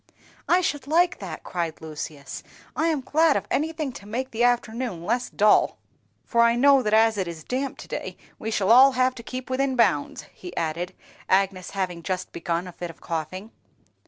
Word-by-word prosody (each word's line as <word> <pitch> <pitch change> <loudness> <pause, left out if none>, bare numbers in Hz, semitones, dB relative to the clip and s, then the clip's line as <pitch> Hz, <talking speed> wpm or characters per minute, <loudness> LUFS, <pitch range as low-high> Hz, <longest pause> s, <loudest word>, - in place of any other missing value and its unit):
"I 360 +1 +5
should 290 -5 -2
like 345 +4 +3
that!" 180 -6 -7
cried 170 -3 -3
Lucius; 150 -2 -7 0.3
"I 320 - +1
am 310 -4 +1
glad 310 +3 +3
of - - -4
anything 310 -1 -1
to 205 - -11
make 255 +5 -3
the 235 +1 0
afternoon 240 -5 0
less 240 +4 0
dull; 210 0 +3 0.5
for 235 - +2
I 235 0 +5
know 275 +2 +5
that 215 -3 -1
as 220 -1 +4
it 185 - -1
is 165 -2 -7
damp 265 - -3
to - - -10
day - - -5 0.2
we 220 - -4
shall 215 -2 +1
all 265 +3 +8
have 255 0 +2
to 245 - -9
keep 255 +2 -6
within 265 +1 0
bounds," 190 -12 +1
he 180 -1 -10
added, 170 +2 -2 0.3
Agnes 190 -1 +1
having 180 -3 -2
just 185 +1 -3
begun 170 +1 -2
a - - -7
fit 175 0 -7
of 165 - -12
coughing. 175 +6 -5
225 Hz, 190 wpm, -25 LUFS, 180-260 Hz, 0.5 s, all